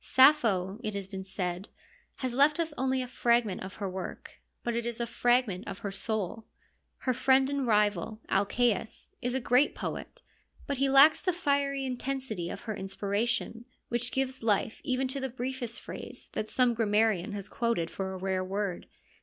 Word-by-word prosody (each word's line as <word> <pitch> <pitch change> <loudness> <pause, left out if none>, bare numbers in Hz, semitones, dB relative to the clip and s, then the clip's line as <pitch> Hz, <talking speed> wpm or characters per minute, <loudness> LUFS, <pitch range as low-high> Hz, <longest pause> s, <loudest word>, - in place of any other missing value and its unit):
Sappho, 225 -9 +4
it 215 -2 -3
has 200 -1 -3
been 190 0 -6
said, 185 -1 -3 0.5
has 255 -2 -3
left 290 +5 +4
us 325 -2 0
only 260 -1 0
a - - -6
fragment 235 -5 +1
of 190 +1 -7
her 200 - -3
work, 190 0 -7 0.2
but 240 -1 -1
it 235 - 0
is 235 0 -3
a 235 - 0
fragment 240 -5 +1
of 195 - -5
her 200 - -1
soul. 215 +1 -3 0.5
Her 255 - +1
friend 265 +2 +4
and 280 -3 -1
rival, 210 -1 +2
Alcaeus, 220 +2 0
is 245 +1 -1
a - - +2
great 250 +3 +3
poet, - - -6 0.4
but 280 - -2
he 275 0 +3
lacks 275 +4 +7
the 365 - +2
fiery 280 -5 0
intensity 255 -8 -3
of - - -6
her 215 -2 -4
inspiration, 210 +4 -2 0.2
which 240 +1 0
gives 265 -1 -1
life 220 -1 +1
even 255 +1 0
to 270 +2 -3
the 265 0 -2
briefest 250 -1 -4
phrase - - -9
that 215 - -3
some 250 -2 +3
grammarian 215 -3 +2
has 200 -1 -5
quoted 230 -9 -1
for 190 -1 -3
a 190 - -5
rare 185 0 -1
word. 195 -1 -3
235 Hz, 180 wpm, -30 LUFS, 200-260 Hz, 0.5 s, lacks